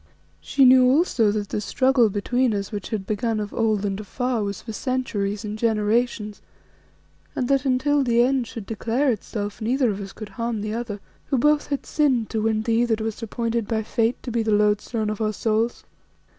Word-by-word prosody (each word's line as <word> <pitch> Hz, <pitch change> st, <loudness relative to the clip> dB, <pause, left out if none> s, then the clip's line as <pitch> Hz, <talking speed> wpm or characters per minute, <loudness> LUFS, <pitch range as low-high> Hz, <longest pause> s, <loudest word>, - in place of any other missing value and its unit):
She 275 Hz, -, +3 dB
knew 255 Hz, 0 st, +7 dB
also 260 Hz, -, +3 dB
that 205 Hz, -1 st, -3 dB
the -, -, -2 dB
struggle 255 Hz, +1 st, +3 dB
between 235 Hz, +4 st, 0 dB
us 200 Hz, 0 st, -4 dB
which 205 Hz, -3 st, -5 dB
had 210 Hz, -4 st, -3 dB
begun 215 Hz, +2 st, -1 dB
of 210 Hz, -1 st, -5 dB
old 215 Hz, -3 st, +1 dB
and 195 Hz, 0 st, -2 dB
afar 245 Hz, +3 st, -2 dB
was 200 Hz, -1 st, -4 dB
for 220 Hz, -, -6 dB
centuries 215 Hz, -5 st, -2 dB
and 210 Hz, +1 st, -5 dB
generations, 215 Hz, -1 st, 0 dB, 0.9 s
and 250 Hz, -, -1 dB
that 275 Hz, 0 st, +2 dB
until 275 Hz, +2 st, +2 dB
the 240 Hz, -1 st, +3 dB
end 255 Hz, -1 st, +1 dB
should 225 Hz, -3 st, -8 dB
declare 235 Hz, +6 st, 0 dB
itself 205 Hz, -1 st, -5 dB
neither 245 Hz, +1 st, +1 dB
of 200 Hz, 0 st, -5 dB
us 195 Hz, 0 st, -7 dB
could 215 Hz, 0 st, -9 dB
harm 230 Hz, +2 st, -3 dB
the 215 Hz, +1 st, -3 dB
other, 225 Hz, -3 st, -4 dB, 0.3 s
who 270 Hz, -, +1 dB
both 295 Hz, +4 st, +3 dB
had 280 Hz, -2 st, -3 dB
sinned 265 Hz, -7 st, +1 dB
to 220 Hz, -, -1 dB
win 220 Hz, 0 st, +1 dB
thee, 230 Hz, +1 st, +2 dB
that 225 Hz, -2 st, 0 dB
wast 220 Hz, +1 st, -4 dB
appointed 230 Hz, 0 st, -2 dB
by 220 Hz, -1 st, -1 dB
fate 230 Hz, +2 st, 0 dB
to 245 Hz, -, -5 dB
be 230 Hz, 0 st, 0 dB
the 220 Hz, -, -2 dB
lodestone 210 Hz, +1 st, +1 dB
of 215 Hz, -, -5 dB
our 215 Hz, 0 st, 0 dB
souls. 225 Hz, +3 st, -1 dB
225 Hz, 200 wpm, -23 LUFS, 210-250 Hz, 0.9 s, knew